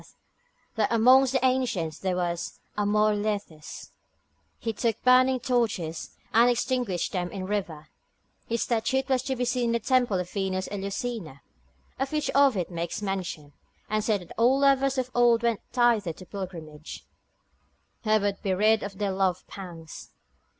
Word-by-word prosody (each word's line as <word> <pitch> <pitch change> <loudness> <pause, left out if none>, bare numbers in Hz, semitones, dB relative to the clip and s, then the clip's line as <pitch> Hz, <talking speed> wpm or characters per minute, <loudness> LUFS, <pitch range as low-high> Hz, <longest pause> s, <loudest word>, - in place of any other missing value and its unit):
saith, - - -21 0.6
that 220 -2 0
amongst 255 +3 +6
the 265 -1 +1
ancients 240 -12 0
there 185 -1 -1
was 175 -1 -3 0.2
Amor 210 +1 +2
Lethes, 205 -7 -4 0.7
he 225 - -3
took 225 0 -1
burning 255 +1 +5
torches, 220 -10 -1 0.2
and 235 +2 +6
extinguished 240 -6 0
them 180 -2 -2
in 195 - -5
the - - -4
river; 175 -7 -3 0.6
his 230 0 0
statute 245 +3 0
was 260 -2 +2
to 265 0 -2
be 250 0 -1
seen 245 0 0
in 230 - +1
the 235 - +1
temple 245 -4 +2
of 180 - -3
Venus 190 -1 -2
Eleusina, 200 - -4 0.6
of 270 0 -1
which 305 -1 -1
Ovid 260 -12 +3
makes 170 +4 -4
mention, 180 -7 -4 0.4
and 215 0 +1
saith 210 -3 +1
that 175 - -12
all 250 +4 +5
lovers 275 -1 +3
of 255 -1 -2
old 240 -1 +4
went 235 -3 +1
thither 235 -7 +2
on 185 - -10
pilgrimage, 165 -6 -8 1.0
that 215 -1 +2
would 200 -1 -1
be 190 -2 0
rid 215 +3 +3
of 195 -1 -6
their 200 -1 -1
love 190 -1 0
pangs. 170 -5 -10
210 Hz, 160 wpm, -27 LUFS, 185-245 Hz, 1.0 s, amongst